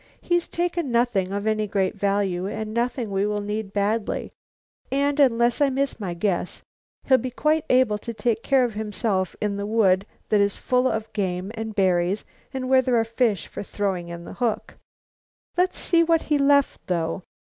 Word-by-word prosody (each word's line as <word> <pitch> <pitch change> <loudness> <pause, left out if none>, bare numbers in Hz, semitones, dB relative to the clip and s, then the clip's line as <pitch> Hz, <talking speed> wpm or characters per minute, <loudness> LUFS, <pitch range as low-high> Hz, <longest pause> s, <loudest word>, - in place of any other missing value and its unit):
"He's 345 -1 0
taken 345 -5 -1
nothing 235 -6 +1
of 200 +1 -3
any 215 -1 +1
great 195 -2 0
value 195 -2 0
and 215 +1 -4
nothing 235 -1 -1
we 195 +1 +1
will 210 0 -1
need 210 0 -4
badly, 205 +2 -1 0.6
and, 280 +2 +1
unless 240 -2 +3
I 285 - +5
miss 270 -1 -1
my 180 -5 -4
guess, 180 -1 -2 0.4
he'll 260 -1 +4
be 255 - -3
quite 305 +5 +1
able 250 -5 +3
to 235 - -6
take 225 0 -1
care 270 0 +3
of 240 -3 -1
himself 210 -3 -1
in 205 -1 -1
a 200 - -2
wood 200 -3 +3 0.2
that 210 -1 +4
is 200 0 +1
full 250 0 +1
of 220 -2 -3
game 190 -1 -2
and 220 -1 -5
berries 185 0 +1 0.3
and 260 -1 -4
where 260 0 +5
there 255 -1 +1
are - - +3
fish 225 -5 0
for - - -7
throwing 195 -4 -2
in 170 0 -7
the - - -8
hook. 235 -3 -2 0.8
Let's 360 +1 +1
see 335 -1 +3
what 330 -1 +2
he 295 -2 +1
left, 280 0 +2
though." 170 0 -1
220 Hz, 185 wpm, -24 LUFS, 200-255 Hz, 0.8 s, I